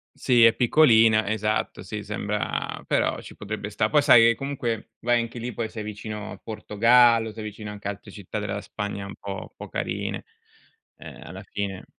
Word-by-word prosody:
Sì, 120 -2 +4
è 115 -1 +7
piccolina, 115 -5 +5
esatto, 110 0 -1
sì, 105 -1 -6
sembra 105 0 -3
però - - 0
ci - - -11
potrebbe 105 0 -5
sta'. 105 +1 0
Poi, 150 - +4
sai, 115 -4 +7
ehm, 115 - -2
comunque, 120 -5 -4
vai 120 0 +2
anche 115 +1 -6
lì, 120 +1 -5
poi 110 +1 -3
sei 110 -1 -6
vicino 105 0 -6
al - - -10
Portogallo, 115 +1 +3
sei 110 0 -8
vicino 105 0 -7
anche 100 -1 -7
a - - 0
altre 100 0 -11
città 100 +2 -6
della 105 -1 -3
Spagna, 100 -1 -5
un 100 - -8
po' 100 - -7
un - - -10
po' - - -9
carine, - - -3 0.7
uhm, - - -11
alla - - -9
fine. 100 -2 -5
110 Hz, 190 wpm, -25 LUFS, 105-115 Hz, 0.7 s, è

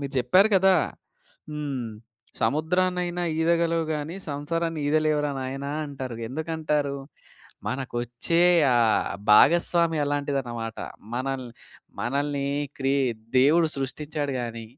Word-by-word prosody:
మీరు 140 -1 -5
జెప్పారు 185 - +5
గదా! 190 0 +5 0.8
హ్మ్. 140 -5 -3 0.5
సముద్రాన్నయినా 175 +6 +1 0.2
ఈదగలవు 165 0 +2
గాని, 150 +4 -4
సంసారాన్ని 165 +3 -2
ఈదలేవురా 150 -1 +2
నాయనా 135 +2 -4 0.2
అంటారుగా! 130 -5 -6
ఎందుకంటారు? 150 -1 -1 0.7
మనకొచ్చే 125 +5 -1 0.3
ఆ - - +4 0.5
భాగస్వామి 170 +7 +5
అలాంటిదనమాట. 135 -6 -2 0.4
మనల్ని 130 -1 -3 0.5
మనల్ని 140 +2 -1 0.3
క్రి 135 0 +1 0.5
దేవుడు 160 +5 +5
సృష్టిచ్చాడు 145 +2 -3
గాని, 115 -1 -5
145 Hz, 90 wpm, -25 LUFS, 130-165 Hz, 0.8 s, జెప్పారు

